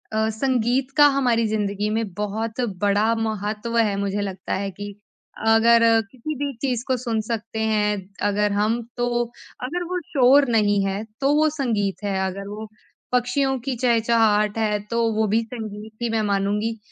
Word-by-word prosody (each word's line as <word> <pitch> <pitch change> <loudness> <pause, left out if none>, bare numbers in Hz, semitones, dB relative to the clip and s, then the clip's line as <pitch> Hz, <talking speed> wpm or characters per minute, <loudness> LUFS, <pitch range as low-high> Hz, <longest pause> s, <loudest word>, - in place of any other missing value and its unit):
अ, 220 0 +1
संगीत 250 +2 0
का 295 - +8
हमारी 240 -4 +2
ज़िंदगी 210 -1 -1
में 220 +1 0
बहुत 215 +4 -3 0.2
बड़ा 205 +2 +3
महत्व 220 +1 -2
है। 215 -3 +3
मुझे 200 0 -1
लगता 190 -2 -4
है 200 0 -2
कि 205 +1 -8 0.5
अगर 230 +1 +5 0.3
किसी 280 +5 -5
भी 280 -1 -2
चीज़ 250 -4 -1
को 260 -1 +1
सुन 230 -3 -1
सकते 225 -1 -4
हैं 210 -1 +1 0.3
अगर 205 0 +1
हम, 215 +4 +1 0.2
तो 240 0 +1 0.4
अगर 345 +8 -2
वो 365 0 -1
शोर 275 +1 +5
नहीं 205 -2 +2
है, 195 +2 -2 0.2
तो 275 +1 +3
वो 310 +1 +4
संगीत 225 -10 -2
है। 200 -2 -1
अगर 195 +1 -6
वो 210 +2 -7 0.4
पक्षियों 250 +2 +1
की 260 +2 -3
चहचहाट 225 -3 +2
है, 210 -2 +1
तो 230 +3 -2
वो 220 +1 +1
भी 220 +3 +2
संगीत 220 -2 -7
ही 235 - 0
मैं 225 -1 0
मानूँगी। 205 +2 0
220 Hz, 165 wpm, -23 LUFS, 205-240 Hz, 0.5 s, का